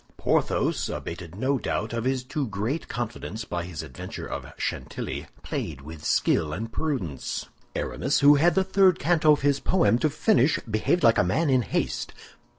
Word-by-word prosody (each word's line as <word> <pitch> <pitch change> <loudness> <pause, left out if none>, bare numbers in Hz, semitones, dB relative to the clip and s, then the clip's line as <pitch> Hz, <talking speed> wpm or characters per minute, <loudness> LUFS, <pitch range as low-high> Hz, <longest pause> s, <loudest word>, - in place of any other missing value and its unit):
Porthos, - - +1
abated, 85 0 -6
no 130 +6 0
doubt, 110 +1 -2
of 115 0 -2
his 130 -1 0
too 135 +2 -3
great 110 - -3
confidence 110 -2 -5
by 85 -3 -3
his 85 -4 -6
adventure 65 - -7
of - - -6
Chantilly, - - -4 0.2
played 70 -4 -4
with 75 +1 -10
skill 75 -2 +2
and 115 +6 -4
prudence. 115 - -3 0.3
Aramis, 140 +4 0
who 145 +1 +8
had 160 +4 +4
the 190 - +4
third 190 -1 +4
canto 155 0 +3
of 145 - -1
his 140 0 +2
poem 165 -10 +3
to 155 - +2
finish, 155 - +3
behaved 110 +10 0
like 115 -1 +5
a - - +5
man 140 - +1
in 130 -1 +4
haste. - - -2
125 Hz, 170 wpm, -26 LUFS, 100-150 Hz, 0.3 s, who